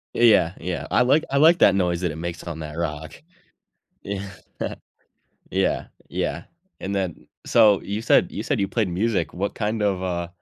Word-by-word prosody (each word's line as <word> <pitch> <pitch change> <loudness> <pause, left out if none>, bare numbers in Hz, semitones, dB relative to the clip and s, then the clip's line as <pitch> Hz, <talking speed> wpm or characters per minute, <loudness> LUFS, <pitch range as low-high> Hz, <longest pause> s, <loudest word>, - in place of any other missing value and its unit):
Yeah, - - -1
yeah, 95 -7 +5
yeah. 85 -4 -4
I - - +4
like 145 +5 +3
I 140 - 0
like 165 +4 +6
that 100 - +6
noise 90 -2 0
that 90 -3 0
it - - -7
makes 85 +1 -5
on 85 -2 -6
that 75 0 -7
rock. 80 -2 -4 0.9
Yeah. 100 0 -5 1.2
Yeah, - - 0 0.2
yeah. - - -2 0.4
And 100 +1 -4
then 95 -4 -3 0.2
So, 105 -3 +5
you 105 +2 -4
said - - +3
you - - -4
said - - -1
you 100 - +1
played 110 -6 0
music, 105 +4 -1
what 100 +3 -3
kind 110 0 -2
of, 95 -3 +1
uh 85 -2 -2
95 Hz, 185 wpm, -23 LUFS, 85-105 Hz, 1.2 s, like